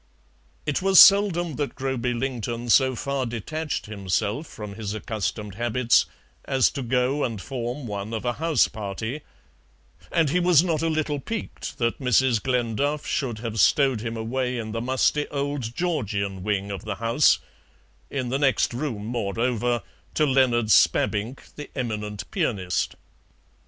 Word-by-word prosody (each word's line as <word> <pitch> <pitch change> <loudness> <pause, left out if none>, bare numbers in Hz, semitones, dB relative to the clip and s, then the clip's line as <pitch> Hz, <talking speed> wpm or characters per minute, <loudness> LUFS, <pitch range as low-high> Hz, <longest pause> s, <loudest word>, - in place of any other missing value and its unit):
It 145 +2 0
was 190 0 +6
seldom 180 -6 +6
that 145 -2 -3
Groby 130 -2 -2
Lington 120 -2 -3
so 130 0 +5
far 135 0 -2
detached 150 +7 -4
himself 105 - -2
from 105 -2 -8
his 105 0 -5
accustomed 105 -1 -4
habits 120 +2 +2 0.4
as 135 -2 +3
to 140 - -5
go 125 +3 +1
and 115 -5 -2
form 125 +3 -5
one 100 -1 -5
of 115 +1 -4
a 120 - +1
house 165 -2 +3
party, 110 +7 -5 0.9
and 160 -4 +2
he 180 - +2
was 175 -3 +5
not 165 -4 0
a 165 - +1
little 155 -2 -1
piqued 225 +9 -6
that 115 -1 -1
Mrs. 125 -3 +3
Glenduff 130 +4 -1
should 120 -6 -2
have 110 -1 -3
stowed 135 +2 +4
him 115 0 -4
away 125 +3 -2
in 110 -2 -4
the 115 +1 -3
musty 130 +4 +1
old 140 -5 -3
Georgian 105 - -2
wing 100 0 -1
of 100 - -5
the 110 -2 -4
house, 115 - +3 0.7
in 130 -3 -3
the 135 +2 0
next 135 -3 +2
room, 120 -5 -3
moreover, 120 +1 -1 0.3
to 155 - +3
Leonard 125 -5 +2
Spabbink, 105 +6 +2
the 150 - -8
eminent 105 -5 -3
pianist. 100 - -1
125 Hz, 150 wpm, -25 LUFS, 110-140 Hz, 0.9 s, was